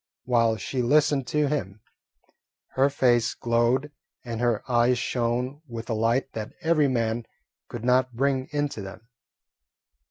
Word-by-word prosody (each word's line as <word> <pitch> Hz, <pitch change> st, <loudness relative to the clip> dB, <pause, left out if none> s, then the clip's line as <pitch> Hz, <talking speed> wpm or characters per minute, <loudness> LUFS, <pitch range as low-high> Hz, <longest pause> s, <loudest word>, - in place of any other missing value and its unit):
While 115 Hz, -3 st, +2 dB
she 125 Hz, +6 st, -3 dB
listened 140 Hz, +1 st, +2 dB
to 150 Hz, +4 st, +1 dB
him, 110 Hz, -9 st, -3 dB, 0.9 s
her 135 Hz, +2 st, +2 dB
face 120 Hz, -4 st, +2 dB
glowed 120 Hz, +4 st, +1 dB, 0.3 s
and 115 Hz, -1 st, -4 dB
her 120 Hz, -3 st, +1 dB
eyes 120 Hz, 0 st, +3 dB
shone 120 Hz, +3 st, -2 dB
with 115 Hz, -1 st, -6 dB
a -, -, +1 dB
light 115 Hz, +5 st, 0 dB
that 110 Hz, -1 st, -6 dB
every 160 Hz, -3 st, +3 dB
man 115 Hz, -2 st, -1 dB, 0.4 s
could 120 Hz, -1 st, -7 dB
not 125 Hz, 0 st, +2 dB
bring 135 Hz, +1 st, 0 dB
into 145 Hz, -6 st, -2 dB
them. 100 Hz, +3 st, -10 dB
120 Hz, 135 wpm, -26 LUFS, 115-135 Hz, 0.9 s, eyes